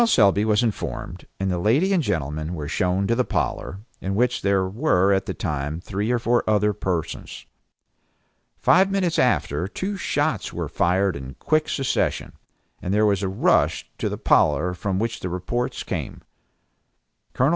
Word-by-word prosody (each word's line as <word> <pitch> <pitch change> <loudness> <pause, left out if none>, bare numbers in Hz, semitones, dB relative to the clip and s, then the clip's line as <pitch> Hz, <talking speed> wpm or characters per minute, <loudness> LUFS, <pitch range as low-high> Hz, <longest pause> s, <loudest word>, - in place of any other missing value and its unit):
Selby 100 - +4
was 110 +1 +3
informed; 115 -3 -4
and 95 -1 0
the 90 - -1
lady 140 - +2
and 180 - +3
gentleman 80 - -2
were 75 -3 -5
shown 90 +4 0
to 115 - +1
the 125 +2 +2
parlor, 95 -4 -3 0.2
in 95 +1 -3
which 125 +3 +1
were 100 - +2
at 95 - 0
the - - -2
time 75 +2 -3
three 100 +4 -3
or 125 - +2
four 120 +1 +1
other 105 0 +3
persons. 90 -5 -4 1.1
Five 190 +2 +4
minutes 185 -4 0
after 90 - +1
two 190 - -4
shots - - -1
were - - -4
fired 95 +1 +1
in 65 -1 -8
quick 155 0 0
succession, 135 -2 -1 0.5
and 90 - -3
there 105 +2 +3
was 100 -2 +2
a 95 - -1
rush 95 - +1
to - - -1
the - - -4
parlor 90 +5 +3
from 95 +1 -2
which 115 +2 -2
the 90 - -4
reports 90 +8 -3
came. - - -5 1.1
Col. 130 +3 +3
100 Hz, 165 wpm, -23 LUFS, 90-120 Hz, 1.1 s, Selby